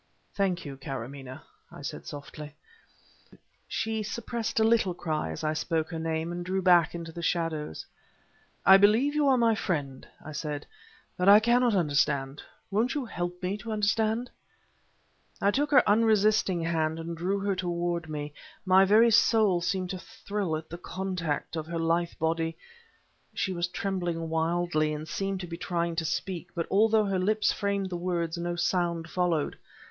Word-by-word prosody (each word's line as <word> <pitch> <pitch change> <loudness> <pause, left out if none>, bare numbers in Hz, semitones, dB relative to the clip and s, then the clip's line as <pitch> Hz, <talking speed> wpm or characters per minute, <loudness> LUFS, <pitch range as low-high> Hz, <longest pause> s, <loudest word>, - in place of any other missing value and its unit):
"Thank 190 -4 0
you, 140 -2 -7
Karamaneh," 135 0 -7 0.3
I - - -11
said, - - -6
softly. 150 0 -8 1.1
She 220 0 -2
suppressed 225 +1 -3
a - - +4
little 220 -5 +3
cry 155 - -2
as 80 - -6
I 155 0 +1
spoke 160 +1 -1
her 165 - -4
name, 160 +1 -2
and 175 0 -4
drew 190 +2 -1
back 175 -2 +5
into 165 -1 -6
the 170 - -7
shadows. 165 - -2 0.8
"I 190 0 +9
believe 220 +8 +4
you 300 -1 +2
are 265 -2 +5
my 230 -2 +4
friend," 145 -11 -3 0.2
I 155 - -7
said, 150 -1 -4 0.5
"but 180 +2 +3
I 205 +1 +10
cannot 240 0 +3
understand. 145 -4 +1 0.3
Won't 230 +7 +1
you 285 -4 -2
help 175 -3 -5
me 190 +3 -1
to 225 +2 -6
understand?" 220 +3 0 1.1
I 200 - +3
took 290 +5 0
her 260 -4 +5
unresisting 210 -4 +3
hand, 160 -1 0
and 165 +1 -5
drew 180 +4 -1
her 200 -1 0
toward 175 -2 -2
me. 150 -1 -5 0.3
My 190 +1 +6
very 220 +4 +5
soul 215 -5 +4
seemed 185 0 -1
to 185 - -5
thrill 195 -4 -3
at 160 0 -9
the 170 - -8
contact 180 -5 -3
of 160 -1 -4
her 170 0 -4
lithe 165 +1 0
body... 165 0 -1 0.8
She 190 - -1
was 175 0 -1
trembling 175 -3 -3
wildly 160 -1 0
and 155 +1 -7
seemed 195 +1 -3
to 175 - -6
be 170 0 -6
trying 170 -1 -2
to 165 - 0
speak, 180 +2 -3
but 170 -2 -1
although 220 +2 +4
her 195 -2 0
lips 215 +3 +2
framed 200 -2 -2
the 175 - -2
words 170 -2 -2
no 175 0 -3
sound 175 -1 0
followed. 175 -4 -1
175 Hz, 170 wpm, -28 LUFS, 165-200 Hz, 1.1 s, I